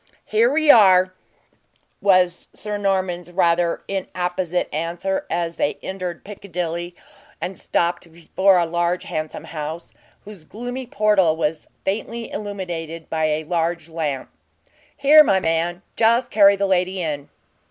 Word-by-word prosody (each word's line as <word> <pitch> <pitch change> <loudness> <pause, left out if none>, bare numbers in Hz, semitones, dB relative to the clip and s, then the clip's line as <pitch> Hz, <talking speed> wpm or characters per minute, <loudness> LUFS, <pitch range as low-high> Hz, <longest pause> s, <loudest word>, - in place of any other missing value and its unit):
"Here 225 +3 +3
we 310 0 +5
are," 185 -4 +6 0.9
was 185 -3 +3
Sir 210 -1 -4
Norman's 185 -3 -1
rather 170 -1 +1
inapposite 180 -2 -2
answer, 170 +5 -2
as 170 -1 -2
they 145 - 0
entered 185 -2 -5
Piccadilly, 175 -3 -5 0.4
and 190 - -4
stopped 170 -1 -1
before 185 +3 +2
a 175 - +3
large 175 +2 -1
and - - -11
handsome 155 0 -4
house, 160 +1 -6 0.3
whose 205 -5 -11
gloomy 245 +7 -6
portal 200 -8 +2
was 160 -1 -2 0.2
faintly 225 +4 -3
illuminated 175 -6 -6
by 160 -1 +1
a 155 0 0
large 170 0 -2
lamp. 155 -5 -3 0.7
"Here, 300 +2 +8
my 195 -9 +3
man 170 +2 -1
just 235 +2 +2
carry 200 -1 +6
the 200 0 0
lady 185 0 +1
in." 150 -4 -3
180 Hz, 130 wpm, -21 LUFS, 165-200 Hz, 0.9 s, Here